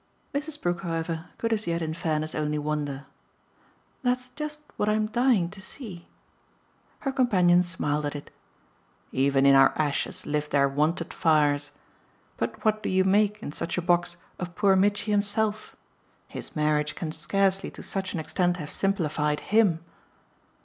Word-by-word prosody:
Mrs. 300 +1 -3
Brook, 175 0 -1
however, 165 -1 -3
could 230 0 0
as 220 -3 -2
yet 170 0 0
in 160 0 -2
fairness 155 -1 -2
only 150 0 -1
wonder. 145 -2 -3 1.0
"That's 250 0 0
just 300 +1 -6
what 210 - 0
I'm 215 0 +2
dying 230 -4 +2
to 195 -1 -11
see." 190 -4 -8 0.9
Her 275 - -1
companion 185 -10 +4
smiled 150 -4 -1
at 145 - -5
it. 145 - -8 0.8
"'Even 135 +1 +2
in 140 - +7
our 135 0 +7
ashes 150 -2 -1
live 150 0 -1
their 140 -1 +3
wonted 150 +5 0
fires'! 145 -3 +3 0.7
But - - -4
what 215 0 +2
do - - -2
you 190 0 +3
make, 205 +2 +2
in - - -4
such 165 - -4
a - - +1
box, 175 0 +1 0.2
of 180 -1 -5
poor 200 -1 +4
Mitchy 205 +2 +2
himself? 210 +1 0 0.5
His - - -7
marriage 150 -1 +1
can 160 -3 -4
scarcely 195 +3 0
to - - -11
such 190 -1 -3
an - - -1
extent 175 +2 0
have 150 -4 -6
simplified 155 -6 0
HIM." 200 -7 +4
175 Hz, 155 wpm, -27 LUFS, 150-205 Hz, 1.0 s, in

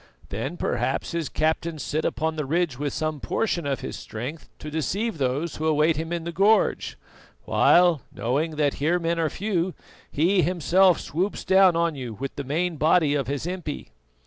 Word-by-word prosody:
"Then - - -4
perhaps - - -1
his 170 -3 -2
captains 160 0 -1
sit 155 +2 -2
upon 160 0 -1
the 150 -3 -3
ridge 160 -4 0
with 145 -1 -1
some 155 0 -2
portion 170 -1 -1
of 135 -2 -2
his - - -5
strength 125 +8 -7
to 150 - -8
deceive 190 +6 -2
those 140 +5 -1
who 155 - -1
await 155 +1 +3
him 160 +2 -4
in 170 -1 -2
the 170 - -4
gorge; 200 +6 +2 0.5
while, 175 -5 +4
knowing 150 +7 -1
that 145 -2 +1
here 165 +4 +2
men 170 -1 -1
are 160 -2 +1
few, 185 -2 -2 0.3
he 180 +6 +2
himself 180 +1 +3
swoops 185 +7 -3
down 190 -2 +5
on 170 -1 +1
you 125 -6 -6
with 135 +5 -5
the 140 - -4
main 165 +5 -1
body 155 0 +3
of 140 -4 -1
his 140 +2 -3
impi." 175 -4 -5
160 Hz, 180 wpm, -25 LUFS, 145-175 Hz, 0.5 s, down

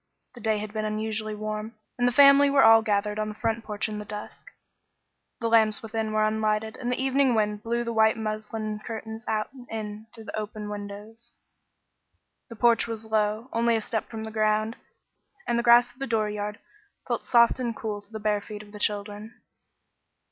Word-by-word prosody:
The 240 - -12
day 220 -1 +1
had 210 0 -6
been 215 -1 -2
unusually 215 0 -2
warm, 215 +1 -5 0.2
and 245 - +3
the - - +3
family 280 +2 +7
were 280 -1 +5
all 225 0 +8
gathered 210 0 0
on 215 0 -1
the 210 - -7
front 225 +1 -1
porch 210 +1 -2
in 210 -1 -5
the - - -5
dusk. 210 0 -8 0.9
The 230 - -1
lamps 220 -2 +3
within 220 0 -3
were 215 0 +2
unlighted, 215 0 0
and 245 -1 -3
the 250 - -1
evening 265 -1 +2
wind 210 -1 0
blew 235 +2 -1
the 235 0 -3
white 220 0 +4
muslin 215 0 -4
curtains 220 0 -6
out 215 +3 -1
and 250 -2 -13
in 215 0 -6
through 225 - -12
the - - -7
opened 210 -1 -5
windows. 210 +3 -9 1.2
The 230 - -9
porch 235 +1 +3
was 225 -1 -6
low, 215 +1 0
only 235 0 +2
a 225 - 0
step 220 0 -3
from 220 -1 -6
the 220 - -6
ground, 215 +1 +1 0.7
and 235 0 +1
the - - -1
grass 240 0 +6
of 255 - -26
the 270 - -3
dooryard 210 -2 -1 0.5
felt - - -2
soft 235 +1 +4
and 235 -3 -2
cool 210 -2 -4
to 205 +1 -20
the 220 - -6
bare 210 -1 0
feet 210 +1 -8
of 205 - -16
the 210 - -10
children. 210 +2 -3
220 Hz, 200 wpm, -26 LUFS, 210-230 Hz, 1.2 s, all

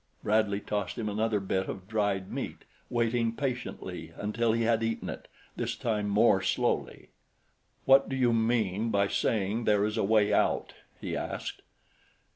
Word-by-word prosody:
Bradley 105 -1 +2
tossed 105 0 -3
him 110 -2 -2
another 105 +1 0
bit 95 -1 -1
of 95 -1 -6
dried 100 -3 -1
meat, - - -5 0.2
waiting 115 -1 +1
patiently 130 -1 -4
until 110 +2 0
he 115 +1 +1
had 115 0 +2
eaten 115 0 -2
it, - - -9 0.3
this - - -2
time 105 -3 -1
more 100 -1 +4
slowly. 95 - -1 0.8
"What 135 +1 +6
do 135 - -2
you 125 -3 +3
mean 110 -2 +1
by 100 -2 +2
saying 110 +2 0
there 105 -1 +3
is 105 +1 -2
a 110 - +1
way 105 0 +3
out?" - - +1 0.3
he - - -4
asked. - - -4
110 Hz, 155 wpm, -29 LUFS, 100-115 Hz, 0.8 s, What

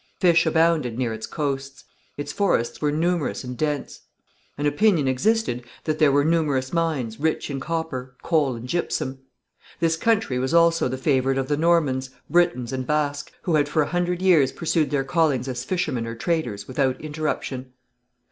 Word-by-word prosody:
Fish 170 -3 +4
abounded 160 -7 +2
near 120 -3 -1
its 110 0 -6
coasts; 135 -3 -4 0.3
its 145 0 -4
forests 180 - 0
were 150 -1 +1
numerous 165 0 0
and 125 0 -6
dense. 150 0 -2 0.6
An 145 - -2
opinion 150 0 +3
existed 130 - +1 0.2
that 155 -1 -2
there 155 -3 +5
were 145 +1 +3
numerous 150 -5 +1
mines, 150 -10 -1
rich 155 -1 -1
in 135 - -3
copper, 135 -5 -4
coal 150 -6 +1
and 115 +2 -8
gypsum. 135 -4 -2 0.6
This 165 -1 +2
country 215 - +1
was 130 +6 0
also 170 -2 +4
the 130 +1 -3
favourite 135 -1 +1
of 135 0 -2
the 145 - +2
Normans, 145 -5 +2 0.2
Britons 170 -8 +2
and 130 -1 -3
Basques, 150 -1 -1
who 155 -4 +3
for 150 +1 +1
a - - -4
hundred 175 +1 -1
years 165 -8 +5
had - - -14
pursued 165 -2 +1
their 145 -2 0
callings 145 -5 +1
as 125 -1 -3
fishermen 135 -8 -2
or 115 - -5
traders 115 -8 -2
without 130 0 0
interruption. 150 -4 -4
145 Hz, 170 wpm, -24 LUFS, 130-165 Hz, 0.6 s, there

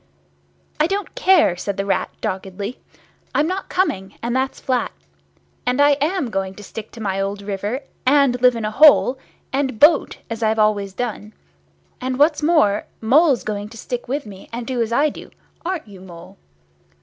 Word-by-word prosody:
"I 305 - +4
don't 395 +2 -3
care," 375 - +4
said 195 +2 -4
the 195 - -1
Rat, 200 - 0
doggedly. 195 +4 -4 0.6
"I'm 295 - +3
not 370 +3 -3
coming, 195 - -1
and 235 +1 -1
that's 265 +1 -1
flat. 255 -2 -1 0.7
And 250 +2 0
I 290 0 +6
am 310 -5 0
going 195 -1 -2
to 210 - -11
stick 215 +2 -8
to 235 - -10
my 195 -3 -1
old 200 +1 -3
river, 205 +6 -3 0.2
and 265 -2 +3
live 250 -1 +5
in 225 -2 -3
a 215 - -2
hole, 270 0 +6 0.3
and 265 -5 -1
boat, 305 +1 +5
as 230 0 -5
I've 220 0 +1
always 205 -2 +1
done. 215 -2 -5 0.7
And 255 0 -2
what's 295 +2 +3
more, 295 -11 +3
Mole's 270 +4 +4
going 210 -1 -4
to 230 - -12
stick 245 +2 -5
to 275 -1 -3
me 195 -2 -12
and 235 0 -5
do 255 -2 -2
as 230 0 -1
I 290 +6 +3
do, - - -10 0.3
aren't 340 -6 -3
you, 195 -3 -13
Mole?" 175 -3 -12
235 Hz, 180 wpm, -21 LUFS, 205-285 Hz, 0.7 s, I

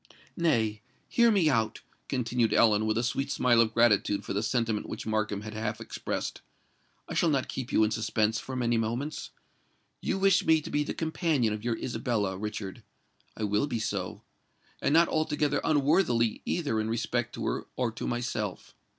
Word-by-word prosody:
"Nay—hear 125 - +1
me 195 -7 +3
out," 115 -7 +1 0.3
continued 120 -2 0
Ellen, 110 -1 +4
with 110 0 +1
a 115 - +1
sweet 135 +3 -1
smile 120 -2 +4
of 110 -1 +2
gratitude 105 -3 +3
for - - -3
the 100 - 0
sentiment 115 -2 -1
which - - -6
Markham 105 -2 -1
had 110 0 -7
half 110 0 -3
expressed: - - -4 0.7
"I - - -6
shall 170 - +3
not 135 -4 +1
keep 130 -2 -5
you - - +4
in 110 - +2
suspense 110 0 0
for 130 - -6
many 120 -2 +1
moments. 120 +7 -3 0.7
You - - -1
wish 195 0 +4
me 160 -4 +4
to - - -8
be 150 - +1
the - - -4
companion 160 - 0
of 105 0 -6
your 120 -1 -1
Isabella, 110 -6 -1
Richard?—I 105 +1 -8
will 105 +5 +1
be 120 - -2
so—and 100 +4 -5
not 165 +3 +6
altogether 150 -2 0
unworthily 145 - +2
either 145 -10 0
in 110 - -2
respect 120 +1 -1
to - - -4
her - - -2
or 125 -2 0
to 110 - -5
myself. 120 -5 -3
115 Hz, 170 wpm, -29 LUFS, 110-145 Hz, 0.7 s, not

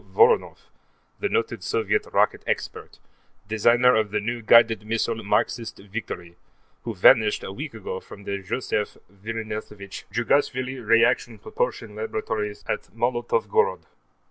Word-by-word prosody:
Voronoff, 455 +1 +3 0.5
the 405 - -1
noted 445 +1 -1
Soviet 440 0 0
rocket - - +2
expert, 435 -1 -3 0.5
designer 120 +3 +4
of 110 -1 +2
the 105 +1 -1
new 115 +3 -3
guided 115 -1 +5
missile 115 +1 -1
Marxist 115 +2 0
Victory, 95 -4 -7 0.5
who 115 -2 -4
vanished 105 +3 +5
a - - -5
week 140 +3 -7
ago 95 -3 -5
from 100 - -13
the 100 0 -3
Josef 105 +1 -2 0.2
Vissarionovitch 105 -1 -6
Djugashvli 130 0 0
Reaction 115 +1 +3
Propulsion - - -3
Laboratories 430 -1 -3
at - - -3
Molotovgorod. 480 0 +1
115 Hz, 120 wpm, -24 LUFS, -, 0.5 s, guided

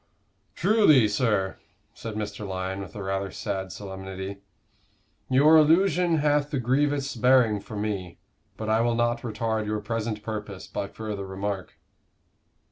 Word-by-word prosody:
"Truly, 175 - +5
sir," 105 -3 0 0.4
said 115 -2 -7
Mr. 105 0 -4
Lyon, 95 0 -3
with 95 -2 -8
a 100 - -5
rather 95 0 -2
sad 95 0 -4
solemnity, 95 +1 -7 0.9
"your 145 +5 +6
allusion 170 +2 +4
hath 145 -1 +2
a - - 0
grievous 140 +3 +1
bearing 120 -3 +4
for 105 - -9
me, 100 -4 -3 0.4
but 110 - -5
I 110 +1 +3
will 120 0 +1
not 120 0 +1
retard 110 -1 -2
your 105 0 -1
present 110 0 -3
purpose 105 -4 -5
by 100 +1 -4
further 105 -3 -6
remark." 95 0 -4
110 Hz, 135 wpm, -26 LUFS, 100-130 Hz, 0.9 s, your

